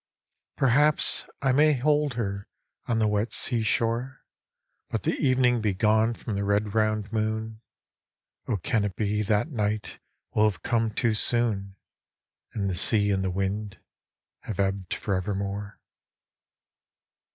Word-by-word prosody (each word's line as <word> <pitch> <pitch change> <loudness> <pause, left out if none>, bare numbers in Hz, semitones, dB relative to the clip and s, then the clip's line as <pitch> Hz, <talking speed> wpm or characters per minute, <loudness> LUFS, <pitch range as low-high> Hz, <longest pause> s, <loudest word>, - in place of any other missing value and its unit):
Perhaps 145 +3 +3 0.2
I 135 - +3
may 150 +3 +4
hold 145 0 +1
her 100 -3 -3 0.4
on 115 - +1
the 110 -1 +2
wet 105 +2 0
sea 120 -2 +1
shore, 115 +4 -1 0.6
But - - -3
the - - +1
evening 125 -3 +2
be 105 -3 0
gone 110 +3 +2
from 110 - -6
the 100 0 -1
red 100 +1 0
round 110 -1 0
moon: 110 0 -2 0.9
O 115 - 0
can 105 +4 0
it 100 -2 -3
be 105 0 0
that 105 +7 0
night 105 -3 -2 0.3
will 110 0 +4
have 100 - -9
come 115 -2 +1
too 115 +1 0
soon, 105 -4 +1 0.8
And 100 -2 -2
the 95 - -1
sea 105 +3 +3
and 95 -1 0
the 95 - 0
wind 95 +1 -3 0.6
have 105 -3 -7
ebbed 95 -2 -1
for 100 - -3
evermore 100 +2 -3
110 Hz, 140 wpm, -26 LUFS, 100-115 Hz, 0.9 s, may